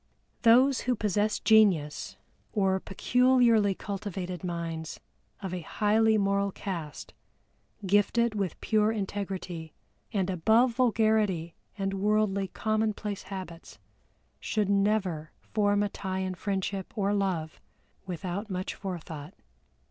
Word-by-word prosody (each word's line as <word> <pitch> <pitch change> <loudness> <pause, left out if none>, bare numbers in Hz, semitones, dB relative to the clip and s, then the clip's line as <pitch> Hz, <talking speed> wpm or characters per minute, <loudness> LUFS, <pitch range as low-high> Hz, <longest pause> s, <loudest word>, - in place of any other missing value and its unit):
Those 255 +4 +5
who 250 - +3
possess 210 0 0
genius 195 -10 +3 0.4
or 190 -3 +2
peculiarly 235 -1 +3
cultivated 190 -3 -5
minds 165 -2 -4 0.4
of 190 -2 -4
a 180 - -3
highly 220 +5 +2
moral 200 0 +1
caste, 170 -8 -6 0.7
gifted 205 +4 +3
with 195 -5 -3
pure 215 -1 +2
integrity, 190 -6 -4 0.4
and 195 -4 0
above 220 +8 +4
vulgarity 220 -8 +2 0.2
and 195 -1 -1
worldly 200 0 +1
commonplace 215 0 -1
habits, 185 -4 -8 0.6
should 210 -3 -1
never 195 -6 +1 0.2
form 205 -1 +3
a 205 - -1
tie 190 -1 -4
in 190 0 -2
friendship 195 +1 -3
or 200 0 +1
love 185 -6 -2 0.5
without 185 +4 -4
much 185 -1 -3
forethought. 165 -6 -7
200 Hz, 110 wpm, -28 LUFS, 185-215 Hz, 0.7 s, Those